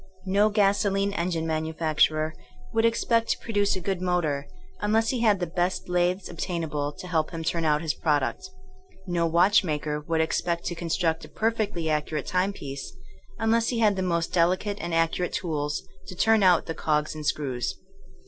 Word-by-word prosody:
No 200 +3 +3
gasolene 200 -1 +2
engine 170 -3 -1
manufac 160 0 -2
turer 155 0 +3 0.4
would 225 0 +3
expect 230 0 +2
to - - +2
produce 205 -3 0
a - - -3
good 185 0 -2
motor 165 -6 0 0.3
un 210 +1 0
less 225 0 +3
he 255 - 0
had 215 -4 +3
the 175 - 0
best 175 +2 -2
lathes 180 +1 +1
obtainable 150 -5 -3
to 180 - -9
help 160 -3 0
him 165 -2 -5
turn 165 0 -1
out 150 0 +2
his 155 -2 0
product 150 - -1 0.6
No 175 -2 0
watchmaker 165 -4 +2
would 160 +2 -1
expect 170 +1 0
to - - -1
construct 165 -1 -1
a - - -14
perfectly 215 -7 -1
accurate 150 -1 -1
timepiece 180 -7 -3 0.4
unless 225 +1 +2
he 245 - -1
had 215 -3 +3
the 190 - -2
most 170 -2 -1
delicate 185 +4 +1
and 170 - -4
accurate 165 +2 0
tools 150 -4 -2 0.2
to 185 - -7
turn 220 +3 +4
out 180 -3 +5
the 165 - -3
cogs 150 -1 0
and 155 -1 -7
screws. 140 -4 -1
175 Hz, 175 wpm, -26 LUFS, 155-200 Hz, 0.6 s, out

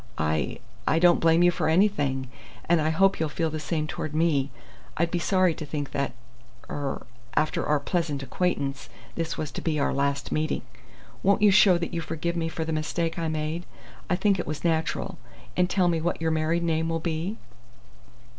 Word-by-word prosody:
I 75 -3 0 0.3
I 160 - +3
don't 175 +1 +5
blame 165 +1 +4
you 175 - +6
for 170 - 0
anything, 145 -8 +2 0.4
and 170 -1 +4
I 155 - +2
hope 195 +5 +3
you'll 160 -1 0
feel 160 +1 -1
the 155 - -3
same 155 0 -1
toward 155 -1 -4
me. 155 -4 +2 0.5
I'd 170 +1 +1
be 175 - 0
sorry 185 0 +3
to 155 - -7
think 145 -1 -4
that 140 0 -1 0.5
er 140 -2 -4 0.3
after 155 - +1
our 150 -1 +2
pleasant 150 -4 -1
acquaintance 140 -4 -2 0.2
this 165 -1 -3
was 155 - -3
to - - -5
be 160 -2 0
our 140 - +1
last 140 0 -1
meeting. 155 0 0 0.6
Won't 200 +2 +3
you 205 - +7
show 190 -2 +6
that 170 +1 -4
you 170 - -1
forgive 165 +2 -3
me 165 -1 -1
for 160 0 -3
the 160 - -2
mistake 165 +2 -1
I 165 - -1
made 155 +2 -3 0.4
I 180 - +3
think 195 +1 +2
it - - -3
was 150 0 -4
natural 160 - -1 0.4
and 180 0 +2
tell 185 -2 +3
me 165 -2 +1
what 175 +2 -1
your 160 0 0
married 160 +2 +1
name 165 -1 +1
will 165 0 0
be?" 170 +6 -2
160 Hz, 195 wpm, -26 LUFS, 150-175 Hz, 0.6 s, you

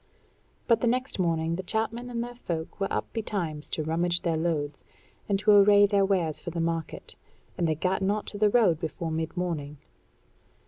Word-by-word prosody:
But 230 -2 +4
the 240 - +2
next 255 -1 -1
morning 165 -1 0
the - - -3
chapmen 225 +5 -2
and 235 -1 -2
their 245 0 -7
folk 170 -10 -5
were 195 - -1
up - - -3
betimes 175 -9 -3
to 155 - -2
rummage 170 +2 0
their 170 -2 0
loads, 155 -3 -2 0.5
and 200 - +3
to 210 +2 +3
array 205 0 +7
their 200 -1 +3
wares 180 -6 0
for - - -5
the 170 0 -4
market; 165 -1 -3 0.4
and 170 - 0
they 155 - +1
gat 185 +5 0
not 205 +2 0
to 205 - -5
the 210 0 +5
road 205 -8 +3
before 165 0 -4
mid 160 +2 -3
morning. 155 -5 -3
180 Hz, 190 wpm, -27 LUFS, 160-210 Hz, 0.5 s, array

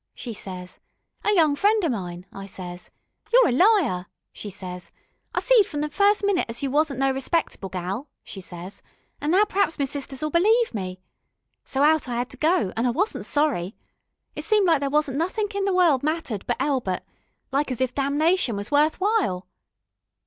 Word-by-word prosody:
she 235 - -6
ses. 185 -3 -8 0.4
'A 420 - +3
young 310 -5 +4
friend 415 +4 +2
o' - - +3
mine,' 180 -6 -4
I 195 0 -8
ses. 180 -2 -9 0.4
'You're - - +6
a - - +1
liar,' 300 - +3 0.3
she 210 - -7
ses, 180 -2 -8 0.4
'I - - +1
seed 485 -6 +5
from 295 -2 -4
the 300 0 -2
first 405 +6 +3
minute 400 -3 +1
as 235 +4 -6
you 275 - -1
wasn't 295 -1 +1
no 270 0 +3
respectable 265 - -2
gal,' 190 +9 -4
she 195 - -9
ses, 180 +1 -9 0.4
'an' 295 - -1
now 380 +5 +5
per'aps 395 -4 0
me 280 - +1
sisters'll 280 +2 -4
believe 440 - +3
me. 185 -3 -4 0.7
So 270 +1 0
out 310 -3 +3
I 240 - -2
'ad 245 - -3
to 260 - -11
go, 305 - +1
an' 230 +3 +1
I - - +3
wasn't 370 - -1
sorry. 255 - 0 0.6
It - - -5
seemed 425 -2 +3
like 330 -4 +4
there 280 0 -1
wasn't 295 -1 +1
nothink 410 +5 -1
in 400 -1 -1
the 395 - +1
world 330 -8 +4
mattered 300 - -3
but 240 - 0
Elbert, 250 -11 -1 0.5
like 280 +2 0
as 255 - -3
if 260 -1 0
damnation 285 - +1
was 205 +4 -6
worth 300 +3 +3
while. 375 - +1
285 Hz, 190 wpm, -24 LUFS, -, 0.7 s, You're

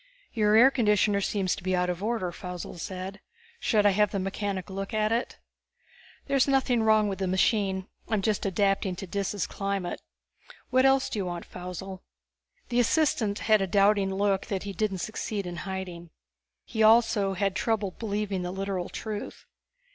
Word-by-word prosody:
"Your 215 -2 +3
air 250 +5 +8
conditioner 210 -5 +2
seems 195 -2 0
to - - -10
be 185 +1 0
out 180 0 +1
of 180 0 -3
order," 215 -4 -1
Faussel 180 0 -7
said. 185 +3 -6 0.4
"Should 215 - +2
I 205 - +6
have 210 +1 +3
the - - -3
mechanic 195 0 -3
look 195 +3 -4
at 215 0 +1
it?" 235 +2 -1 0.9
"There's 275 -1 +2
nothing 260 -3 +2
wrong 215 -1 +4
with 195 -1 -3
the 190 - -1
machine; 190 0 +1 0.2
I'm 215 -3 0
just 215 -1 0
adapting 195 -1 +1
to 195 - -6
Dis's 200 +1 -2
climate. 195 -3 -3 0.7
What 260 +1 +5
else 270 0 +3
do 215 - -3
you 195 - -1
want, 175 -1 -5
Faussel?" 180 +1 -7 0.7
The 245 0 +1
assistant 240 -6 +2
had 215 -2 +5
a 195 - 0
doubting 200 +1 +3
look 195 -1 +1
that 195 -2 -2
he 200 -1 -5
didn't 195 -2 -1
succeed 215 -2 -4
in 175 -1 -6
hiding. 180 -3 -6 0.6
He 220 - -3
also 220 -3 +4
had 195 0 0
trouble 210 -1 0
believing 205 -2 -3
the 180 - -3
literal 190 -1 -3
truth. 215 -2 -6
200 Hz, 170 wpm, -27 LUFS, 190-215 Hz, 0.9 s, air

